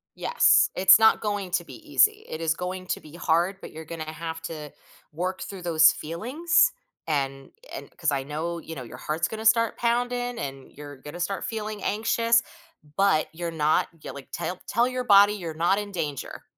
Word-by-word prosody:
Yes, 485 - +4
it's 185 +2 +7
not 220 0 +5
going 205 -3 -3
to 175 -1 0
be - - -11
easy; 430 +6 +3
it 160 - -6
is 165 -1 +1
going 185 +1 -5
to - - -2
be 155 +1 -14
hard, 175 +3 +1
but - - -9
you're 160 0 -9
gonna 155 -1 -6
have 160 +1 -6
to 150 -3 -7 0.4
work 185 +4 -3
through 195 -2 -7
those 165 -2 +5
feelings, 275 - +1 0.4
and 135 -3 -2 0.2
and - - -7
'cause 160 -4 0
I 135 -1 -1
know, 160 +4 -4
you 160 - -9
know, 130 - -6
your 120 - -10
heart's 160 +2 -2
gonna 220 0 -7
start 230 0 +3
pounding 245 0 -1
and 135 -4 -7
you're 145 -1 -10
gonna 150 +6 -10
start 190 +3 -2
feeling 215 -2 -5
anxious, 230 +2 +2 0.6
but 195 -5 +3
you're 170 0 -4
not 155 -1 +2
Yeah, - - -7
like, 140 -2 -11
tell 180 0 -4
tell 235 +3 +2
your 255 0 -3
body 205 -2 +6
you're 175 -6 -5
not 170 +5 +2
in 205 -1 -6
danger, 150 -7 -5
175 Hz, 190 wpm, -26 LUFS, 155-215 Hz, 0.6 s, it's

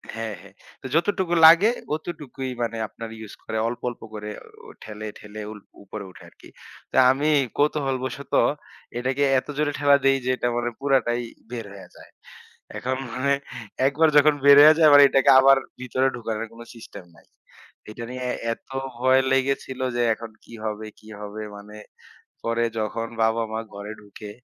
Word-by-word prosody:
হ্যাঁ, 115 -2 -4
হ্যাঁ। 100 +1 -17 0.3
তো - - -14
যতটুকু 175 0 +1
লাগে 170 +7 +8 0.3
অতটুকুই 145 -5 -7
মানে 115 -1 -2
আপনারা 115 +1 -9
ইউজ 110 -1 -10
করে 110 - -4
অল্প, 120 - -5
অল্প 120 - -11
করে 105 0 -6 0.4
অ - - -12
ঠেলে, 110 0 -7
ঠেলে 105 +1 -10
উল 105 - -10 0.2
উপরে 100 +1 -8
উঠে - - -16
আরকি। - - -18 0.4
তো - - -2
আমি 145 +3 0 0.3
কৌতূহলবশত 140 -2 -1 0.6
এটাকে 130 +3 -1 0.2
এত - - -15
জোরে 150 -1 +1
ঠেলা 145 0 +5
দেই, 135 0 +4
যে - - -1
এটা - - -1
মানে 120 0 -1
পুরাটাই 130 -3 +1 0.3
বের 115 -3 -5
হয়ে 100 - -12
যায়। - - -16 0.7
এখন 130 +1 -2 0.2
মানে 140 +2 +1 0.5
একবার 155 +3 +3
যখন 150 +1 +6
বের 140 0 +9
হইয়া 155 +1 +9
যায়, 160 -2 +6
এবার 145 0 +9
এটাকে 135 0 +4
আবার 135 0 +6 0.2
ভিতরে 130 +1 0
ঢুকানোর 115 -1 -4
কোন 115 - -13
সিস্টেম 110 -5 -11
নাই। - - -22 0.6
এটা 120 +2 -8
নিয়ে 125 0 -6
এ - - -2 0.2
এত - - -19 0.3
ভয় 130 +2 +4
লেগেছিল, 135 0 -1 0.2
যে 120 - 0
এখন 115 0 -9
কি - - -15
হবে, 110 0 -4
কি 110 - -16
হবে? 105 +1 -7
মানে 105 +1 -12 0.7
পরে 115 0 0
যখন 110 +1 -3 0.2
বাবা-মা 110 0 0
ঘরে 100 +1 -7
ঢুকে 105 0 -11
120 Hz, 165 wpm, -24 LUFS, 110-140 Hz, 0.7 s, বের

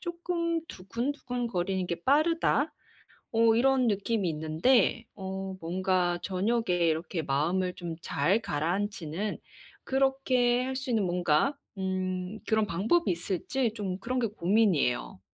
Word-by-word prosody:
쪼끔 340 -1 -2
두근두근거리는 230 -4 -2
게 170 -1 -4
'빠르다.' 310 +1 +2 0.6
어 225 0 +4
이런 260 0 +3
느낌이 205 -2 0
있는데 165 +10 +2
어 190 -1 -5
뭔가 180 +1 0
저녁에 220 +4 0 0.2
이렇게 160 +1 -2
마음을 170 +7 0
좀 170 -2 -5
잘 180 +9 +1
가라앉히는 180 +3 -2 0.5
그렇게 260 -2 +2
할 260 +1 -3
수 265 0 -5
있는 220 -3 +2
뭔가 175 - +2 0.2
음 185 +1 -2
그런 220 -1 +3
방법이 215 - +1
있을지 210 - -1
좀 195 -4 -3
그런 255 +5 -2
게 235 - +1
고민이에요. 185 - +1
200 Hz, 265 characters per minute, -29 LUFS, 180-250 Hz, 0.6 s, 어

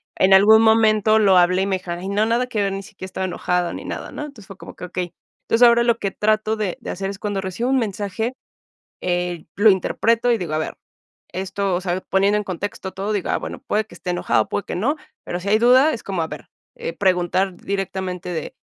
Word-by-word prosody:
en 190 +1 +4
algún 215 +3 +7
momento 220 -1 +4
lo 195 -3 +5
hablé 180 +1 +4
y 195 - 0
me 190 -1 +1
dijeron: 175 -1 -6
"Ay 190 +2 -5
no, 205 +2 +2
nada 235 +3 +1
que 220 -5 -1
ver, 195 - 0
ni 195 - -4
siquiera 200 -1 -10
estaba 190 0 -4
enojada 180 -1 -1
ni - - -7
nada", - - -6
¿no? - - -7
Entonces, 255 -10 -11
fue 195 - -11
como - - -11
que - - -7
okey. 180 -1 -4 0.3
Entonces, 240 +2 +6
ahora 235 0 +5
lo 235 -1 +2
que 195 - -1
trato 215 +2 +1
de 210 -5 -3
de - - -7
hacer 195 +1 -3
es 195 - -9
cuando 205 -2 -2
recibo 190 +6 -3
un 270 - +3
mensaje, 215 +1 -2 0.7
eh, 175 -2 -2
lo 210 +2 +6
interpreto 230 +5 +2
y 230 - +1
digo, 170 -5 -4
a - - +1
ver, 155 - -3 0.6
esto, 190 +1 -2
o 175 - 0
sea, 180 -1 -2
poniendo 200 +2 +2
en 210 - -3
contexto 190 0 -5
todo, 200 +3 -3
digo: 200 - -2
"Ah, - - +1
bueno, - - -6
puede 215 +1 +1
que - - -15
esté 180 - -5
enojado, 175 - +1
puede 205 - -2
que - - -5
no", 240 +11 +1 0.3
pero 175 - -4
si 200 - -5
hay 215 - +4
duda 255 +6 +5
es 230 - -6
como 190 -4 -2
a 160 - -3
ver, 150 -5 -9 0.5
preguntar 185 0 +1
directamente 190 -2 -4
de, 165 -4 -4
195 Hz, 235 wpm, -21 LUFS, 185-220 Hz, 0.7 s, algún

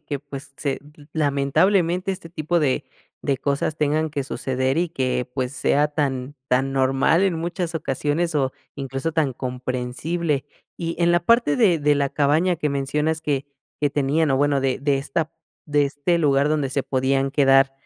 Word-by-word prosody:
que 145 -2 -3
pues 140 0 -10
se 140 -2 -1 0.4
lamentablemente 170 +6 +2
este 185 -3 -9
tipo 165 +1 -1
de 135 -4 +1 0.4
de 135 -2 0
cosas 140 +3 -1
tengan 155 +1 +1
que 140 -1 -2
suceder, 130 0 -1
y 175 +1 +1
que, 125 -4 -1
pues, 130 -1 -2
sea 145 +3 +2
tan 140 -2 -2
tan 135 +2 +1
normal 135 +6 +3
en 190 -3 +2
muchas 170 +1 -3
ocasiones, 155 +3 -1
o, 130 -2 +1 0.2
incluso, 135 +3 -3
tan 155 -5 +1
comprensible. 130 +5 -2 0.3
Y 165 -1 -3
en 170 - +4
la 175 - +4
parte 230 -11 +4
de 185 -8 +4
de 145 0 +3
la 140 -1 0
cabaña 155 +5 +2
que 150 -2 -1
mencionas 150 +3 -1
que 140 -2 -1 0.3
que 145 - +3
tenían. 145 +2 +1
O 135 - +3
bueno, 140 0 +2
de 130 -1 0
de 140 0 +1
esta 155 +3 -2 0.3
de 145 -1 +2
este 145 +5 0
lugar 140 -2 +3
donde 150 -3 +1
se 135 +1 -1
podían 135 +1 0
quedar, 135 -1 +4
145 Hz, 170 wpm, -23 LUFS, 135-160 Hz, 0.4 s, en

